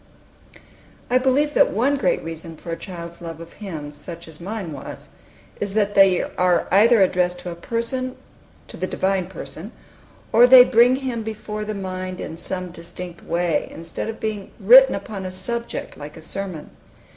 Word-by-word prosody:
I 255 - +5
believe 275 +3 +2
that - - +5
one 255 +8 +1
great 210 -10 0
reason 165 0 -7
for 170 - -8
a - - -1
child's 170 -1 -9
love 165 -2 -7
of 165 0 -11
hymns, 155 -8 -7
such 170 +1 -8
as 160 0 -13
mine 195 -2 -5
was, 140 - -9 0.5
is 200 0 -3
that 205 -1 +2
they 195 -2 +5
are 180 -1 +1
either 215 +2 +6
addressed 180 -1 +1
to 180 -1 -6
a - - -6
Person, 235 +7 -3 0.5
to - - -10
the 185 - -2
Divine 190 -2 0
Person, 190 +1 -8 0.6
or 240 +2 +8
they 255 0 +10
bring 245 +1 +5
Him 260 -4 -3
before 215 -1 -5
the 215 0 -4
mind 185 -1 -5
in 160 - -6
some 180 +1 -5
distinct 175 +1 -9
way, 170 -2 0
instead 165 +6 -6
of 225 - -6
being 210 -3 -4
written 255 +6 +8
upon 200 0 -6
a 185 - -4
subject, 235 +5 -5
like 150 +2 -9
a - - -10
sermon. 180 -2 -5
190 Hz, 175 wpm, -22 LUFS, 170-225 Hz, 0.6 s, they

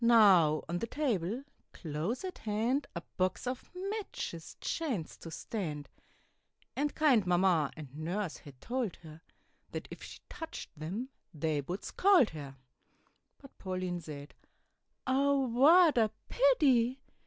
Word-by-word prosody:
Now, 195 -10 +6
on 175 +2 -2
the 230 - -3
table 235 - -1 0.3
close 165 - -3
at 370 -1 -6
hand, 230 +7 0
A 170 - -3 0.2
box 185 +4 0
of 250 +1 -4
matches 385 - -5
chanced 250 - -3
to 165 - -7
stand, 160 -4 -4 0.9
And 290 +1 -1
kind 260 -11 +4
Mamma 175 -4 +3
and 145 -3 -9
Nurse 175 +4 -3
had 140 -4 -14
told 240 - -2
her, 160 0 -11 0.5
That - - -4
if - - -9
she - - -9
touched 325 -1 -7
them 185 - -4 0.3
they 155 -1 0
would 175 +8 -5
scold 370 - +4
her. 140 -3 -8 0.8
But 275 - -16
Pauline 185 -2 -3
said, 145 -2 -9 0.7
"Oh, 275 +1 +3
what 310 +7 +6
a 220 -1 +4 0.2
pity! 275 - +4
210 Hz, 130 wpm, -32 LUFS, 165-270 Hz, 0.9 s, Now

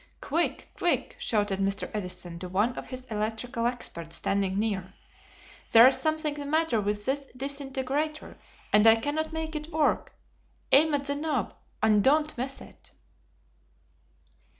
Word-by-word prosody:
"Quick! 330 +4 -1
Quick!" - - 0
shouted 205 - 0
Mr. 195 0 0
Edison 180 -4 -5
to 180 0 -6
one 210 +7 +1
of - - -7
his 255 -1 -6
electrical 225 +2 -2
experts 170 -9 -5
standing 195 -1 0
near. 200 -3 -2 0.8
"There 230 +1 +10
is 260 +1 +7
something 310 -1 0
the 290 -1 -6
matter 310 -7 +2
with 205 0 -2
this 275 +1 -1
disintegrator, 275 +2 -3 0.3
and 210 +1 +6
I 225 - +9
cannot 300 +7 -2
make 320 0 -4
it 305 +2 -5
work. 310 -2 +1 0.6
Aim 300 +2 +6
at 280 0 -2
the 285 - 0
knob, 285 -6 -2 0.3
and 210 -2 +4
don't 300 +3 +3
miss 265 +3 -4
it." - - -14
255 Hz, 145 wpm, -28 LUFS, 210-295 Hz, 0.8 s, There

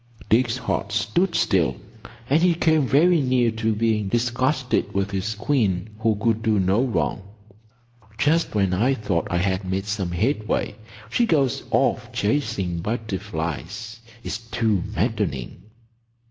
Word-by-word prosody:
Dick's 120 +1 +3
heart 125 - -2
stood 170 - +1
still, 95 -6 +2 0.5
and 150 +5 +3
he 175 -1 +4
came 160 -4 +2
very 165 +5 +4
near 125 -3 +2
to 110 0 -1
being 110 -2 +1
disgusted 125 +4 0
with 100 0 0
his 100 +3 -2
queen 105 -6 0
who 110 -1 +2
could 110 +1 0
do 110 -2 +2
no 95 +6 +2
wrong. 120 -4 -1 1.0
"Just 160 +1 +1
when 95 -3 +2
I 120 +9 +2
thought 100 -7 -1
I 85 - 0
had 95 +2 0
made 95 +1 -2
some 100 -3 -2
headway, 110 - -1 0.4
she 235 - +2
goes 140 - +2
off - - +1
chasing 100 -7 -1
butterflies. 100 - -4 0.2
It's 110 - -4
too 115 -4 0
maddening!" 65 -3 -2
110 Hz, 135 wpm, -23 LUFS, 95-130 Hz, 1.0 s, he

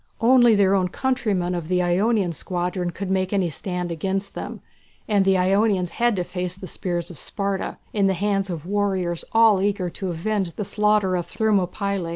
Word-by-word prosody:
Only 240 -1 +5
their 200 -1 +4
own 185 -2 +2
countrymen 205 -6 -1
of 170 -3 -4
the 180 +1 +1
Ionian 190 +1 +1
squadron 180 +2 -3
could 185 +2 -5
make 185 -1 0
any 190 -5 +1
stand 180 +2 -3
against 195 +4 -2
them, - - -6 0.5
and 205 -3 +3
the 195 -1 +4
Ionians 190 -1 +2
had 240 -2 +1
to 180 - -1
face 180 0 -4
the 190 0 -9
spears 175 -1 -3
of 160 - -10
Sparta, 200 -1 -3 0.2
in 200 -2 +2
the 190 - +1
hands 195 0 0
of 165 -3 -5
warriors 190 -3 -1
all 225 -4 +5
eager 195 -3 0
to 190 +2 -5
avenge 185 +1 -2
the 210 - -3
slaughter 210 -2 +2
of 175 -1 -2
Thermopylæ. 200 -3 0
190 Hz, 185 wpm, -23 LUFS, 180-205 Hz, 0.5 s, Only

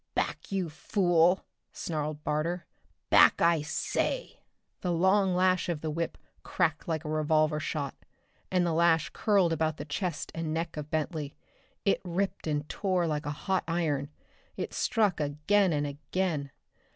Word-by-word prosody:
"Back, - - -2
you 190 -3 0
fool!" 175 +1 +2 0.3
snarled 150 -2 -4
Barter. 165 +3 -1 0.5
"Back, - - +7
I 170 -2 +4
say!" 160 - -2 0.4
The 180 - -1
long 190 +2 +3
lash 185 0 +2
of 160 -4 -2
the 155 - -2
whip 165 +2 -3 0.2
cracked 160 -4 0
like 160 -1 -2
a - - -3
revolver 155 0 +2
shot, 145 -3 -3 0.6
and 180 -1 +2
the 170 - +1
lash 165 0 +3
curled 195 -6 +3
about 160 -1 0
the 145 - -6
chest 165 +1 -3
and 165 -1 -3
neck 165 0 -3
of 150 -1 -6
Bentley. 155 -2 -2 0.5
It 200 - +2
ripped 190 0 -2
and 150 -1 -1
tore 185 -4 0
like 150 -2 -2
a 145 0 -5
hot 190 -1 +1
iron. 155 -5 0 0.5
It - - -4
struck 210 -7 +1
again 155 +7 +2
and 145 -1 0
again. 145 +1 -2
165 Hz, 150 wpm, -29 LUFS, 150-180 Hz, 0.6 s, Back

